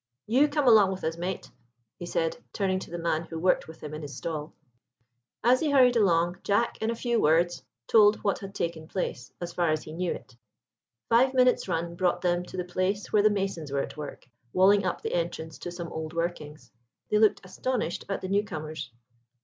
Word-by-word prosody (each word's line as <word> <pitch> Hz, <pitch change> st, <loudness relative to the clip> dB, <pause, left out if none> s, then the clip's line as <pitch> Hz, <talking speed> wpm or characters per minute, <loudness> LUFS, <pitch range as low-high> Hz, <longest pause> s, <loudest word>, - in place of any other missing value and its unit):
You 260 Hz, +7 st, +4 dB
come 295 Hz, -2 st, 0 dB
along 215 Hz, -5 st, +7 dB
with 190 Hz, -, -6 dB
us, 160 Hz, 0 st, -1 dB
mate," 180 Hz, +2 st, -4 dB, 0.5 s
he 175 Hz, -, -6 dB
said, 165 Hz, -1 st, 0 dB, 0.2 s
turning 190 Hz, -3 st, 0 dB
to -, -, -9 dB
the 175 Hz, -, -5 dB
man 165 Hz, -2 st, 0 dB
who 165 Hz, -, -7 dB
worked 180 Hz, +3 st, +2 dB
with 160 Hz, -, -12 dB
him 150 Hz, 0 st, -6 dB
in 155 Hz, -, -5 dB
his 145 Hz, -3 st, -7 dB
stall. 155 Hz, -2 st, -4 dB, 0.9 s
As 250 Hz, +3 st, +5 dB
they 310 Hz, -, 0 dB
hurried 255 Hz, -3 st, +5 dB
along, 175 Hz, -4 st, +2 dB
Jack, 205 Hz, +4 st, 0 dB
in 220 Hz, -, 0 dB
a 230 Hz, -, -1 dB
few 235 Hz, 0 st, 0 dB
words, 170 Hz, +3 st, +3 dB, 0.2 s
told 210 Hz, -, +6 dB
what 200 Hz, -, +1 dB
had 195 Hz, 0 st, -9 dB
taken 165 Hz, -4 st, -3 dB
place, 155 Hz, -9 st, -4 dB
as 175 Hz, -1 st, -5 dB
far 175 Hz, -2 st, +1 dB
as 155 Hz, 0 st, 0 dB
he 155 Hz, -, -9 dB
knew 175 Hz, +1 st, -1 dB
it. 130 Hz, -, -8 dB, 0.7 s
Five 260 Hz, +3 st, +4 dB
minutes' 255 Hz, -4 st, +4 dB
run 170 Hz, -1 st, -2 dB
brought 175 Hz, 0 st, 0 dB
them 175 Hz, -1 st, +1 dB
to 185 Hz, -, -9 dB
the 180 Hz, -, -1 dB
place 185 Hz, +3 st, -2 dB
where 210 Hz, -, +5 dB
the 215 Hz, -, +5 dB
masons 195 Hz, -7 st, -2 dB
were 140 Hz, 0 st, +1 dB
at -, -, -8 dB
work 150 Hz, -1 st, -8 dB, 0.3 s
walling 195 Hz, +2 st, +5 dB
up -, -, -3 dB
the -, -, -2 dB
entrance 165 Hz, -2 st, -3 dB
to 175 Hz, -, -6 dB
some 170 Hz, -1 st, -6 dB
old 160 Hz, 0 st, -5 dB
workings. 155 Hz, -6 st, -4 dB, 0.4 s
They 210 Hz, -, +4 dB
looked 215 Hz, -1 st, +4 dB
astonished 220 Hz, -1 st, -2 dB
at 195 Hz, -, -2 dB
the -, -, -4 dB
newcomers. 160 Hz, -, -2 dB
180 Hz, 205 wpm, -27 LUFS, 165-205 Hz, 0.9 s, along